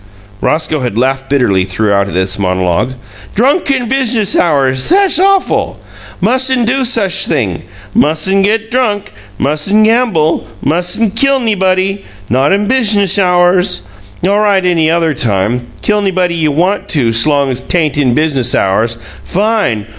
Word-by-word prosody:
Roscoe 155 Hz, -1 st, -1 dB
had 125 Hz, -5 st, -3 dB
laughed 135 Hz, +2 st, -1 dB
bitterly 120 Hz, -10 st, +1 dB
throughout 100 Hz, +1 st, 0 dB
this 95 Hz, +2 st, -1 dB
monologue. 90 Hz, +5 st, -1 dB, 0.4 s
"Drunk 280 Hz, -, +1 dB
in 260 Hz, -3 st, 0 dB
business 235 Hz, -5 st, 0 dB
hours! 135 Hz, -, +1 dB
Thass 390 Hz, 0 st, +3 dB
awf'l! 390 Hz, 0 st, +1 dB, 0.4 s
Mus'n' 260 Hz, -1 st, +1 dB
do 260 Hz, +4 st, 0 dB
such 200 Hz, -5 st, +1 dB
thing! 100 Hz, -, -1 dB, 0.3 s
Mus'n' 160 Hz, +6 st, +1 dB
get 225 Hz, +3 st, -1 dB
drunk, 215 Hz, -, -1 dB, 0.2 s
mus'n' 155 Hz, +10 st, +1 dB
gamble, 215 Hz, -, +1 dB, 0.2 s
mus'n' 180 Hz, -, 0 dB
kill 275 Hz, +5 st, +1 dB
'nybody 195 Hz, -3 st, 0 dB, 0.3 s
not 130 Hz, +4 st, +2 dB
in 200 Hz, +1 st, +1 dB
business 205 Hz, -5 st, +2 dB
hours! 180 Hz, 0 st, +2 dB, 0.4 s
All 200 Hz, +1 st, +2 dB
right 200 Hz, -3 st, +1 dB
any 165 Hz, -3 st, +2 dB
other 165 Hz, -1 st, +1 dB
time. 120 Hz, 0 st, -2 dB, 0.2 s
Kill 210 Hz, 0 st, +1 dB
'nybody 185 Hz, -3 st, 0 dB
you 160 Hz, -3 st, 0 dB
want 180 Hz, +7 st, -1 dB
to 120 Hz, -7 st, +1 dB
's 115 Hz, +6 st, +3 dB
long 140 Hz, -3 st, +1 dB
'tain't 150 Hz, +3 st, -1 dB
in 125 Hz, -4 st, +1 dB
business 140 Hz, -6 st, +1 dB
hours! 110 Hz, +4 st, 0 dB, 0.3 s
Fine! 200 Hz, -, -1 dB
180 Hz, 140 wpm, -12 LUFS, 130-215 Hz, 0.4 s, Thass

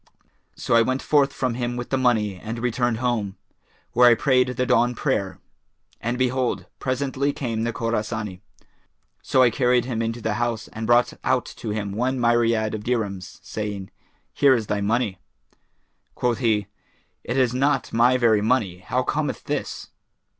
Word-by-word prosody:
So -, -, -2 dB
I 115 Hz, -, +6 dB
went 130 Hz, +3 st, 0 dB
forth 145 Hz, -2 st, +3 dB
from 130 Hz, -4 st, -1 dB
him 120 Hz, 0 st, -3 dB
with 120 Hz, -, -6 dB
the -, -, +2 dB
money 110 Hz, -5 st, +2 dB
and 110 Hz, +5 st, -6 dB
returned 120 Hz, 0 st, 0 dB
home, 110 Hz, -5 st, -1 dB, 0.5 s
where 125 Hz, +1 st, +6 dB
I 120 Hz, -, +6 dB
prayed 130 Hz, 0 st, +3 dB
the 125 Hz, 0 st, -1 dB
dawn 125 Hz, -1 st, +2 dB
prayer; -, -, -1 dB, 0.6 s
and 120 Hz, +2 st, -2 dB
behold, 130 Hz, -1 st, 0 dB
presently 135 Hz, +1 st, -1 dB
came 115 Hz, -6 st, -3 dB
the 115 Hz, -, 0 dB
Khorasani, 110 Hz, -4 st, -3 dB, 0.8 s
so 130 Hz, -, +3 dB
I 120 Hz, -, +4 dB
carried 125 Hz, 0 st, +2 dB
him 120 Hz, -3 st, -2 dB
into 115 Hz, +1 st, -2 dB
the 110 Hz, -1 st, -1 dB
house 120 Hz, -2 st, -2 dB
and 110 Hz, 0 st, -5 dB
brought 120 Hz, +1 st, +4 dB
out -, -, +1 dB
to -, -, -5 dB
him 105 Hz, -1 st, -3 dB
one 125 Hz, +5 st, -1 dB
myriad 115 Hz, -2 st, +2 dB
of 105 Hz, -1 st, -4 dB
dirhams, 105 Hz, -6 st, -3 dB
saying, 105 Hz, -3 st, -5 dB, 0.4 s
'Here 140 Hz, -2 st, +5 dB
is 115 Hz, -3 st, -2 dB
thy 105 Hz, 0 st, -1 dB
money.' 105 Hz, -2 st, 0 dB, 1.0 s
Quoth 120 Hz, -2 st, 0 dB
he, 110 Hz, -4 st, +1 dB, 0.6 s
'It 125 Hz, -, -3 dB
is 125 Hz, -2 st, +3 dB
not 140 Hz, +3 st, 0 dB
my 120 Hz, +2 st, +4 dB
very 115 Hz, -4 st, +3 dB
money; 105 Hz, -6 st, 0 dB
how -, -, -1 dB
cometh -, -, -2 dB
this?' -, -, -4 dB
120 Hz, 165 wpm, -23 LUFS, 110-125 Hz, 1.0 s, I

